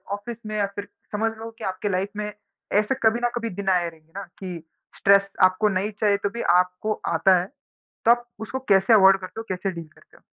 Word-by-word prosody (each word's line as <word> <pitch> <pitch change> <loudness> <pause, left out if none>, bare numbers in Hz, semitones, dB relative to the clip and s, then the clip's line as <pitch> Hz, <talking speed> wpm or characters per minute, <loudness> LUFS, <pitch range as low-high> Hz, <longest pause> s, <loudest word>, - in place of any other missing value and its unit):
Office 225 +3 -8
में, 215 0 -4
या 205 - +2
फिर 205 0 -5 0.3
समझ 225 +2 0
लो 225 +1 -7
कि - - -9
आपके 190 +2 -2
लाइफ 190 +1 -1
में 210 0 -3 0.5
ऐसे 215 +5 -1
कभी 225 +1 +4
ना 240 - +2
कभी 230 -1 -2
दिना 195 -1 +2
आए 175 -2 +1
रहेंगे 160 -1 -22
ना 200 - -5 0.2
कि 180 -4 -6 0.3
स्ट्रेस 200 0 +5 0.2
आपको 185 +3 +2
नहीं 195 +2 -1
चाहिए, 205 -2 +3
तो 200 - -2
भी 235 +3 -6
आपको 180 +4 +2 0.2
आता 185 +3 +4
है। 175 - -3 0.6
तो 230 - +7
आप 240 0 +1
उसको 240 +4 -4
कैसे 195 +3 +5
अवॉइड 195 -2 +7
करते 185 +4 -8
हो, - - -12
कैसे 190 +1 -2
डील 170 -3 -8
करते 155 - -23
हो? - - -24
200 Hz, 225 wpm, -24 LUFS, 185-215 Hz, 0.6 s, तो